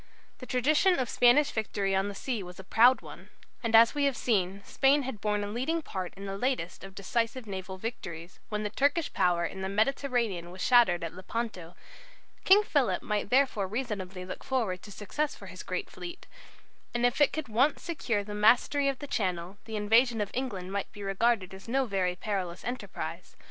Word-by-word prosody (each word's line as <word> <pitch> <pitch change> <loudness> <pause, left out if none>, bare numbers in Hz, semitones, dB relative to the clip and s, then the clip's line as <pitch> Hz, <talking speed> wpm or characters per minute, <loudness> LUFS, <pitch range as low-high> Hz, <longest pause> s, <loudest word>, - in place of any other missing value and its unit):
The 255 - -9
tradition 305 +9 +3
of 255 -3 -1
Spanish 280 +5 +5
victory 205 -3 -1
on 190 +1 +1
the 205 - -6
sea 240 0 -3
was 180 -1 -10
a - - -8
proud 240 +6 +5
one, - - -12 0.3
and 230 -2 +1
as 230 +1 +7
we 290 -1 +1
have 275 -3 +1
seen 200 -3 0
Spain 275 +2 +3
had 250 -6 -6
borne 210 -1 0
a - - -3
leading 265 +10 -1
part 185 -8 -5
in 200 0 -8
the 195 0 -5
latest 250 -9 -2
of 195 -1 -10
decisive 230 +4 -2
naval 190 -2 -6
victories, 185 -6 -7
when 210 0 -2
the 210 - -3
Turkish 285 +6 +1
power 175 -2 +2
in 190 - -5
the 190 - -2
Mediterranean 220 -4 0
was 185 +1 -11
shattered 230 -9 +5
at 165 - -4
Lepanto; 185 -2 -5 0.7
King 405 +3 +7
Philip 285 - +1
might 210 -1 -2
therefore 250 -6 +2
reasonably 195 -5 -4
look 185 - -7
forward 220 -9 -1
to 205 - -12
success 290 +10 -3
for - - -12
his - - -9
great - - -4
fleet, 350 +1 -9 0.7
and 240 0 +2
if 245 +4 +1
it 290 - +5
could 310 -1 -4
once 250 +7 +2
secure 240 -11 -1
the 205 +1 -7
mastery 240 +7 +4
of 275 - -2
the 290 - -7
Channel, 185 -6 -2
the 220 -1 -6
invasion 225 +3 +3
of 205 -1 -2
England 200 -8 -3
might 200 0 -3
be 205 - -9
regarded 195 0 +1
as 190 +2 -11
no 265 +3 +1
very 190 -5 0
perilous 185 -3 -4
enterprise. 245 +2 -5
215 Hz, 195 wpm, -29 LUFS, 190-255 Hz, 0.7 s, as